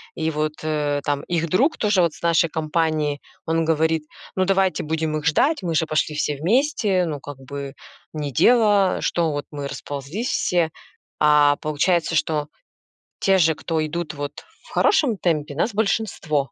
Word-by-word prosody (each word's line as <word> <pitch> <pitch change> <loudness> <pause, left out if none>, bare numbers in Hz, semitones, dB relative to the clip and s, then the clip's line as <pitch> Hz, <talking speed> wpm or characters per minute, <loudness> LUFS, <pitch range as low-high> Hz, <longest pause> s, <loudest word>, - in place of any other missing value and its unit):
и 160 -1 -1
вот, 155 0 -1
э, 150 -2 -1
там 145 -1 -1
их 170 -1 -1
друг 270 - +2
тоже 205 -4 +2
вот 170 -3 +2
с - - -15
нашей 165 -1 +3
компании, 155 -2 -1 0.2
он 165 0 +1
говорит: 160 0 +1 0.3
"Ну, 185 0 +2
давайте 190 -3 +1
будем 155 0 -1
их 150 - -6
ждать, 280 - +2
мы 165 -2 -1
же 160 - +2
пошли 155 -1 -1
все 150 -1 -1
вместе, 205 - +1
ну 150 -3 -4
как 145 0 -9
бы 140 +1 -7 0.4
не 150 -2 -3
дело, 205 - +4
что 165 -2 0
вот 145 0 -3
мы 145 -1 -5
расползлись 145 - -5
все". 170 -3 +1 0.5
А 150 -1 +5
получается, 165 +3 0
что 150 -1 0 0.7
те 195 -1 +3
же, 160 -2 +4
кто 160 0 -2
идут 160 0 -4
вот 145 0 -5 0.3
в - - -17
хорошем 275 - +2
темпе, 150 -5 -1
нас 210 +9 0
большинство. 205 -7 -1
160 Hz, 165 wpm, -22 LUFS, 150-185 Hz, 0.7 s, А